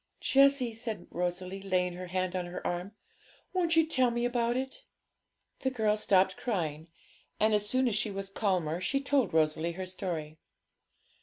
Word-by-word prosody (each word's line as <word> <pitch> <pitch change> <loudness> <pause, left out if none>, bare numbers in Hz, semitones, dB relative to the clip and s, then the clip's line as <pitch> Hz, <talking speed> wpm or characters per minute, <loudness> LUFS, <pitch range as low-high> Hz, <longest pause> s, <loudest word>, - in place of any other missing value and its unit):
'Jessie,' 275 -3 +4
said 225 -1 -4
Rosalie, 180 +2 -3
laying 180 -2 0
her 180 +1 -7
hand 185 0 -1
on 180 -1 -2
her 175 - -7
arm, 180 +4 -3 0.6
'won't 345 -3 +2
you 325 -1 +5
tell 260 -5 +2
me 240 0 -1
about 240 0 +1
it?' 265 - -4 0.8
The 265 - 0
girl 220 -5 +1
stopped 190 -2 +3
crying, 165 -8 -3 0.5
and 215 +1 +3
as 210 0 +1
soon 255 +1 +2
as 235 - +1
she 215 +1 0
was 195 -1 -5
calmer, 180 -5 0
she 275 +8 +1
told 275 -2 +1
Rosalie 160 +1 +1
her 185 +2 -5
story. 170 -5 -5
195 Hz, 165 wpm, -30 LUFS, 180-245 Hz, 0.8 s, you